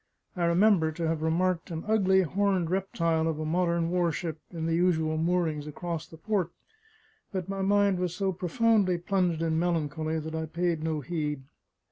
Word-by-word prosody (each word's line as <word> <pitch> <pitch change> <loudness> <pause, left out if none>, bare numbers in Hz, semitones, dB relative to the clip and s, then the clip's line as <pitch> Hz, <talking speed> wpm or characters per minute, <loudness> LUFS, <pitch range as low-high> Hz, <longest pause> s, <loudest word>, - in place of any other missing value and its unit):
I 175 -2 0
remember 170 -1 +4
to 165 +1 -2
have 160 -1 -1
remarked 170 +3 0
an 165 -1 -4
ugly 190 -3 +4
horned 185 0 0
reptile 170 -4 0
of 160 -2 -2
a 155 - -2
modern 170 0 +1
warship 170 -2 -1
in 165 -2 -4
the 165 - 0
usual 160 -2 +2
moorings 160 -3 0
across 165 +1 -5
the 160 - -13
port, 190 0 -1 0.8
but 190 -4 -3
my 195 0 -3
mind 200 -1 +3
was 180 -1 -2
so 195 0 0
profoundly 195 +1 +2
plunged 175 -2 0
in 160 -1 +1
melancholy 160 -2 -1
that 160 0 -5
I 160 0 -3
paid 170 0 -1
no 160 -2 -1
heed. 150 -1 -3
170 Hz, 170 wpm, -28 LUFS, 160-185 Hz, 0.8 s, remember